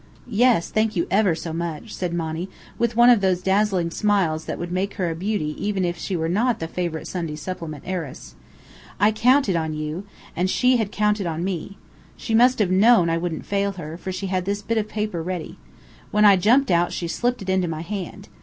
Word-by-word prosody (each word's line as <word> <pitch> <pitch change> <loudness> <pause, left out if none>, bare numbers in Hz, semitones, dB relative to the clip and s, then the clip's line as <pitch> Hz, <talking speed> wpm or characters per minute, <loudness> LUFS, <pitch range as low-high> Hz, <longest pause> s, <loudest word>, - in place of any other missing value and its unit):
"Yes, 235 -5 +2
thank 215 0 +1
you 170 - +1
ever 195 -4 +3
so 160 0 -6
much," 170 +5 -5
said 180 -2 -3
Monny, 165 +1 -3 0.3
with 235 -1 0
one 240 +1 +7
of 230 -4 +4
those 185 -2 +1
dazzling 190 -3 +1
smiles 185 -6 +1
that - - -4
would 175 0 -5
make 190 +2 -2
her 180 -4 -1
a - - -4
beauty 180 -4 -2
even 200 -3 0
if 175 0 -1
she 190 - -4
were 160 -1 -1
not 220 +7 +1
the 165 - -3
favourite 170 -2 -3
Sunday 165 -4 -4
supplement 155 -3 -6
heiress. 175 -7 -5 0.7
"I 205 +2 +5
counted 230 -1 +3
on 160 -2 -1
you 155 +6 -5 0.3
and 180 +2 0
she 250 +5 +3
had 215 -3 -2
counted 210 -2 +1
on 165 0 -3
me. 190 +1 -4 0.4
She 225 - -4
must 245 +3 +5
have 200 -4 +1
known 190 -3 +5
I 165 - +1
wouldn't 170 -2 -4
fail 200 0 0
her, 165 -4 -7
for 185 +2 -6
she 190 +2 -4
had 185 -1 -1
this 200 +1 -2
bit 225 +2 0
of 215 0 -3
paper 210 -5 -3
ready. 175 -1 -5 0.5
When 210 0 +3
I 200 -1 +8
jumped 240 +8 +3
out 175 0 +2
she 170 - -3
slipped 245 +6 -1
it 190 - -6
into 185 -1 +1
my 160 -1 -4
hand. 190 +1 -6
185 Hz, 215 wpm, -23 LUFS, 170-210 Hz, 0.7 s, I